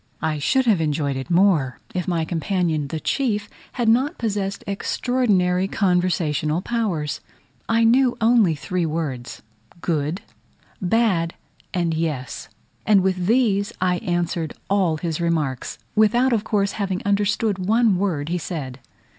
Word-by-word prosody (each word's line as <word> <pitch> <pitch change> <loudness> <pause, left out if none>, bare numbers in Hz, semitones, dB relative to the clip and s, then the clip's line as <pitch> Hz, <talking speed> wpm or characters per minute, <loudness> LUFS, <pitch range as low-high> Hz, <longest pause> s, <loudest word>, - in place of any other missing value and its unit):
I 155 -1 -1
should 260 - +2
have 210 -8 +3
enjoyed 145 -2 0
it 130 +4 -5
more, 170 -8 +3
if 180 +1 -2
my 170 -3 0
companion, 165 -3 -1
the 160 +3 -4
chief, 210 - -1 0.3
had 240 -3 -1
not 260 +9 +3
possessed 200 -3 -2
extraordinary 195 -3 +1
conversational 175 -5 +1
powers. 185 - -2 0.5
I 230 0 +3
knew 245 +2 +4
only 225 -7 +4
three 180 +5 -2
words: 145 -6 -4 0.4
"good," 160 +1 -1 0.6
"bad," 185 -4 +1 0.4
and 170 -2 0
"yes:" 155 -6 -3 0.3
and 205 -3 +4
with 185 -1 0
these 215 -4 +2
I 180 -1 +1
answered 175 -2 -2 0.2
all 185 -6 +2
his 165 0 -3
remarks, 155 -7 -1 0.2
without 240 +4 +4
of 215 -3 +1
course 200 -2 0
having 190 -1 -2
understood 200 -1 0
one 225 -1 +4
word 165 -6 -1
he 175 +1 -1
said. 140 -7 -5
180 Hz, 135 wpm, -22 LUFS, 160-210 Hz, 0.6 s, knew